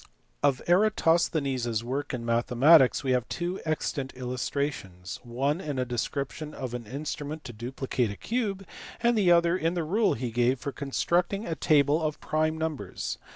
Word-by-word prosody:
Of 135 -3 +2
Eratosthenes 165 - +2
s 115 -1 -1
work 135 +4 -3
in 120 -2 -4
mathematics 125 +6 +5
we 130 - 0
have 125 -2 +1
two 175 +2 -3
extant 150 -3 -2
illustrations: 125 -7 -4
one 135 +7 -1
in 145 -5 -4
a 130 - 0
description 140 +5 -3
of 130 -2 -5
an 120 -3 -5
instrument 150 +3 -5
to 120 - -8
dupli 125 +4 -6
cate 125 -4 +1
a 100 - -6
cube, 210 -5 -2 0.4
and 235 0 +4
the 195 -5 +4
other 170 0 +4
in 170 -1 0
the 170 - 0
rule 205 +8 +2
he 120 0 -3
gave 120 +2 +2
for 140 - -4
constructing 175 +9 0
a 165 - -2
table 150 0 +3
of 155 -1 -2
prime 155 +1 0
numbers. 155 - -4
140 Hz, 170 wpm, -28 LUFS, 125-165 Hz, 0.4 s, mathematics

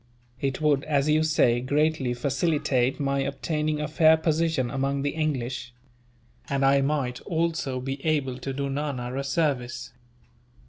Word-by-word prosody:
It 135 0 -2
would, 145 -3 +3
as 145 -1 +1
you 155 +1 +4
say, 125 -6 +3
greatly 145 -1 +1
facilitate 135 -1 0
my 140 -1 0
obtaining 150 +2 -1
a 150 - -2
fair 160 +1 +5
position 160 -5 0
among 135 +1 -1
the 145 - 0
English; 130 -5 -3 0.7
and 140 -1 +1
I 140 0 +4
might 135 -3 -1
also 165 -6 -1
be 135 +2 -5
able 140 -5 0
to 135 - -4
do 140 +1 -2
Nana 135 -3 -3
a 135 - -2
service. 125 -6 -1
140 Hz, 145 wpm, -26 LUFS, 130-155 Hz, 0.7 s, fair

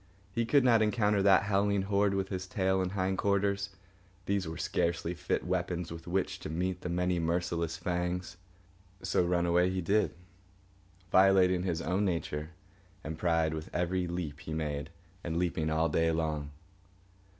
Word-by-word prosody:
He 115 -1 0
could 140 +1 +4
not 115 -3 +5
encounter 105 -2 +2
that 95 -1 +5
howling 100 -1 +1
horde 100 0 +2
with 95 0 -1
his 95 -1 -4
tail 95 0 +1
and 90 0 -2
hind 95 -1 -1
quarters. 100 0 +1 0.6
These 100 -3 0
were 80 0 -5
scarcely 85 0 -1
fit 85 - -2
weapons 90 -1 -2
with 85 0 -8
which 95 +2 -1
to - - -6
meet 90 +3 -2
the 90 - -4
many 90 0 0
merciless 85 0 -1
fangs. 90 0 -2 0.7
So 95 -1 +2
run 85 0 +1
away 90 +1 +3
he 95 0 -2
did, 100 +5 +1 1.0
violating 95 -1 +5
his 90 -3 -2
own 90 +4 0
nature 80 -5 -2 0.5
and 80 +1 -4
pride 80 -2 +2
with 80 0 -5
every 90 +1 0
leap 85 -4 -4
he 80 0 -6
made, 75 -2 -3 0.3
and 85 -1 -2
leaping 85 -3 0
all 80 +1 +2
day 80 +1 +2
long. 80 -3 -2
90 Hz, 160 wpm, -31 LUFS, 85-95 Hz, 1.0 s, not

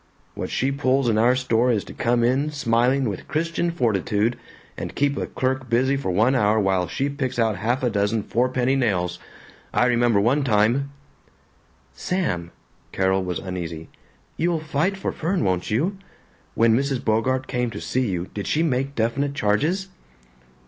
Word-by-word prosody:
What - - -5
she 135 +2 0
pulls 135 -1 +1
in 110 -2 +2
our 120 +3 +4
store 125 -1 +1
is 105 -4 0
to - - -11
come 120 0 +1
in 130 +5 +2
smiling 130 -1 +1
with 100 -3 -5
Christian 165 +2 -1
Fortitude 115 - 0 0.4
and - - -6
keep 140 0 +1
a - - -3
clerk 130 -1 -2
busy 130 +4 +2
for 135 -7 -3
one 110 +8 +3
hour 110 -4 +3
while 95 -3 +1
she 115 +11 -1
picks 135 -3 -3
out 110 -4 +1
half 120 +7 -1
a 125 - +3
dozen 105 +1 0
fourpenny 125 +3 +1
nails. 90 -9 0 0.5
I - - +2
remember 120 -3 +3
one 130 +8 +2
time 120 +4 +2 0.5
" - - -36
"Sam!" 90 - -2 0.4
Carol 95 0 +1
was 90 -1 -3
uneasy. 85 -4 -6 0.5
"You'll 170 0 +1
fight 155 +5 -1
for 195 - -2
Fern, 175 0 -1
won't 90 -3 0
you? 170 - 0 0.6
When 115 0 +4
Mrs. 135 0 -1
Bogart 130 +4 +1
came 125 -2 -1
to - - -7
see 130 -3 -1
you 90 -2 -2
did 100 - -4
she 160 - +1
make 135 -2 -1
definite 135 +5 0
charges?" 150 - 0
125 Hz, 170 wpm, -23 LUFS, 105-140 Hz, 0.6 s, our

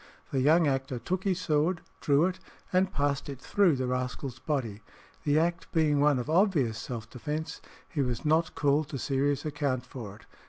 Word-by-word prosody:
The 135 - +1
young 160 +5 +5
actor 135 -2 -1
took 180 - -3
his 185 -2 +1
sword, 160 +1 +1 0.2
drew 145 +3 +3
it, 185 0 -2 0.3
and 185 +1 +3
passed 145 0 -1
it 135 -3 -6
through 185 0 +3
the 130 -1 -1
rascal's 125 0 -3
body. 125 -8 -2 0.4
The 145 0 +3
act 170 +1 0
being 155 -3 +3
one 145 -1 +4
of 125 - -3
obvious 155 - +2
self 115 -3 -6
defence, 150 +7 -5 0.3
he 145 - -2
was 125 -1 -2
not 160 +2 +2
called 145 +1 +2
to 140 - -4
serious 140 +2 0
account 140 -4 -1
for 115 -6 -8
it. 110 - -17
145 Hz, 185 wpm, -29 LUFS, 130-160 Hz, 0.4 s, young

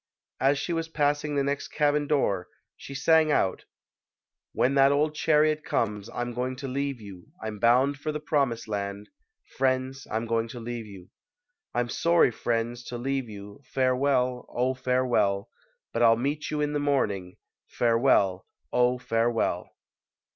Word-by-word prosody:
As 140 +2 +3
she 170 - -2
was 165 -1 -2
passing 145 -1 0
the 140 - +2
next 140 +1 -2
cabin 145 -1 +1
door 100 -11 +1 0.3
she 140 - -10
sang 155 +2 +4
out: 95 -9 +1 0.9
When 130 - +1
that 135 0 +5
old 150 +2 +2
chariot 155 0 +2
comes, 105 -1 -1
I'm 120 0 -4
going 125 +2 -2
to 135 +1 -6
leave 140 0 -2
you; 100 -4 -11
I'm 110 -1 -6
bound 130 +5 +3
for 155 +1 -2
the 150 - -4
promised 140 -7 0
land. 100 -1 -4 0.5
Friends, 130 0 0
I'm 110 +2 -2
going 115 0 0
to 120 +1 -8
leave 115 -1 -5
you. 95 -3 -13 0.6
I'm 120 0 +1
sorry, 170 -1 +3
friends, 120 +2 -2
to 120 - -5
leave 135 0 -2
you, 100 +2 -10
Farewell! 130 -1 +1
Oh, 125 +2 0
farewell! 125 -6 0 0.4
But 115 - -1
I'll 115 -1 +6
meet 145 +5 -2
you 150 -1 -1
in 150 0 0
the 145 - 0
morning! 105 -11 -1 0.3
Farewell! 115 -6 +2 0.3
Oh, 125 0 +3
farewell 115 -1 0
125 Hz, 155 wpm, -27 LUFS, 115-140 Hz, 0.9 s, I'll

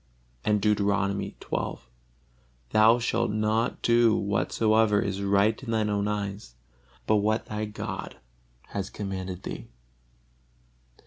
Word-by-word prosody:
And 105 -1 +2
Deuteronomy 100 -2 +1
xii: - - -2 1.0
"Thou 110 +2 +6
shalt 120 0 0
not 110 +2 0
do 115 -1 +4
whatsoever 105 +2 +2
is 100 -1 -2
right 100 +3 +2
in 130 - -8
thine 110 -2 +1
own 100 0 0
eyes, 100 - -4 0.5
but 110 - +3
what 110 +2 +1
thy 110 0 -3
God 105 -2 -6 0.5
has 100 -1 -4
commanded 95 -2 -5
thee." - - -6
105 Hz, 115 wpm, -27 LUFS, 100-110 Hz, 1.0 s, Thou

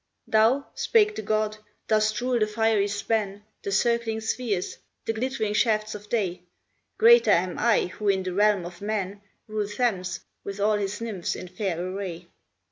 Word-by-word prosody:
"Thou," 230 +6 +3
spake 425 -2 +3
the - - -3
god, 215 0 0 0.3
"dost 215 -1 +2
rule 250 -1 +1
the 215 - +2
fiery 215 -1 +2
span, 205 0 -2 0.2
The 200 - -4
circling 230 +1 +1
spheres, 220 -4 -2 0.3
the 225 - 0
glittering 225 -2 -1
shafts 215 -1 +1
of 210 0 -9
day; 185 -6 -1 0.6
Greater 470 +1 +7
am 180 +1 +2
I, 235 -1 +4
who 205 +3 -3
in 190 -1 +2
the 185 -1 -3
realm 205 -2 +3
of 175 +2 -9
man 205 -1 -3 0.2
Rule 215 -1 -2
Thames, 205 -4 -1 0.2
with 200 0 -6
all 210 +1 +3
his 205 +1 -3
Nymphs 210 -7 -3
in - - -7
fair 180 -2 -2
array. 180 -1 -5
210 Hz, 165 wpm, -26 LUFS, 195-225 Hz, 0.6 s, Greater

